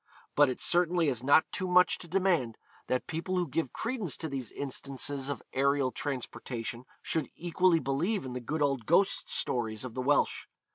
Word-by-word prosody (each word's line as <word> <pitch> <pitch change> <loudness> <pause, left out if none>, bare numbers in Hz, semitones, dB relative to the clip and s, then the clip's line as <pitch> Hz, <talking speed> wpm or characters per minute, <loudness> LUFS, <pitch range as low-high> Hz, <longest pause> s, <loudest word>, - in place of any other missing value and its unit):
But 145 -2 +5
it 130 - -4
certainly 175 -2 +3
is 125 -4 -1
not 145 +4 +4
too 185 - -3
much 180 0 +4
to 175 - -9
demand, 175 - +1 0.3
that 130 - 0
people 165 +3 -3
who 175 -1 0
give 140 -1 -2
credence 225 - -2
to 160 - -4
these 135 -6 -4
instances 135 0 -2
of 140 - -4
aerial 140 -1 +2
transportation 125 -3 -5 0.2
should 160 - -1
equally 175 0 +2
believe 160 +8 -1
in 125 - -5
the 125 - -3
good 150 +6 -1
old 135 -5 0
ghost 190 +4 +2
stories 110 -2 -1
of 125 - -7
the 130 - -3
Welsh. 145 +3 +1
145 Hz, 180 wpm, -30 LUFS, 130-175 Hz, 0.3 s, But